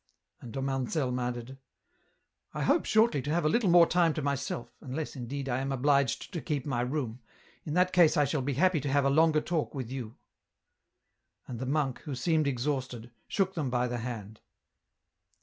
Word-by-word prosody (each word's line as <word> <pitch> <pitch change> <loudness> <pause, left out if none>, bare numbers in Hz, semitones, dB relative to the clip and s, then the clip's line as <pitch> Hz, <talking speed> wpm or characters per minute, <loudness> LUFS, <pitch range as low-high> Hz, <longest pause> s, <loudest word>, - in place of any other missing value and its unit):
And 120 - -10
Dom 135 +1 -3
Anselm 130 -1 -1
added: 125 +1 -4 0.5
" - - -46
I - - -1
hope - - +2
shortly 220 - +3
to 145 - -5
have 165 +1 +1
a - - +4
little 215 +2 +2
more 170 0 +8
time 170 -2 +2
to 155 - -2
myself, 140 -3 -3
unless, 145 +4 -5
indeed, 135 +2 -5
I 125 -1 0
am 135 +1 -2
obliged 140 - +1
to 170 - -3
keep 145 -4 -2
my 130 -5 -1
room, 125 -2 -3 0.5
in 150 - -3
that 180 0 +3
case 175 -4 +5
I 145 - +4
shall 140 +1 -1
be 140 +2 -1
happy 175 +4 +3
to 140 - -2
have 140 0 +3
a 140 - +3
longer 155 +1 +4
talk 165 -3 -2
with 130 -3 -5
you." 125 -4 -6 1.3
And 120 -3 -6
the 130 - -4
monk, 140 -2 0
who 145 -4 -6
seemed 155 +4 +1
exhausted, 130 -3 -3 0.2
shook 190 -1 0
them 150 -7 -2
by 125 0 +1
the 120 0 -3
hand. 110 -3 -6
140 Hz, 195 wpm, -29 LUFS, 125-155 Hz, 1.3 s, more